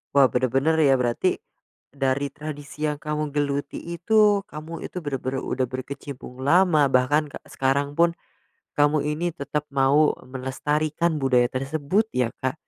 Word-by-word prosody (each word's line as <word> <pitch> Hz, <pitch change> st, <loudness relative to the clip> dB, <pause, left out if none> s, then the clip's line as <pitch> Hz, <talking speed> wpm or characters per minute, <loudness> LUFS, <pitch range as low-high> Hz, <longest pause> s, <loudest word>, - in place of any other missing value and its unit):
Wah, 140 Hz, -2 st, +7 dB
bener-bener 130 Hz, +5 st, +1 dB
ya 135 Hz, -2 st, +4 dB
berarti, 120 Hz, -1 st, 0 dB, 0.5 s
dari 135 Hz, 0 st, 0 dB
tradisi 150 Hz, 0 st, -7 dB
yang 150 Hz, -1 st, -3 dB
kamu 150 Hz, -1 st, -3 dB
geluti 145 Hz, -1 st, -1 dB
itu, 205 Hz, +4 st, +2 dB
kamu 160 Hz, -1 st, -8 dB
itu 180 Hz, -, -5 dB
bener-bener 135 Hz, -3 st, -3 dB
udah 130 Hz, -, -1 dB
berkecimpung 130 Hz, 0 st, -7 dB
lama, 155 Hz, -1 st, +4 dB
bahkan 145 Hz, +4 st, +2 dB
ke -, -, -8 dB
sekarang 140 Hz, +2 st, 0 dB
pun 170 Hz, 0 st, +4 dB, 0.7 s
kamu 145 Hz, +1 st, +3 dB
ini 170 Hz, +2 st, -2 dB
tetap 145 Hz, -1 st, -3 dB
mau 140 Hz, +3 st, +4 dB
melestarikan 150 Hz, +5 st, -1 dB
budaya 125 Hz, -3 st, +3 dB
tersebut 145 Hz, +9 st, 0 dB
ya, 125 Hz, -2 st, +1 dB, 0.2 s
Kak. 130 Hz, -, +1 dB
145 Hz, 135 wpm, -24 LUFS, 135-155 Hz, 0.7 s, Wah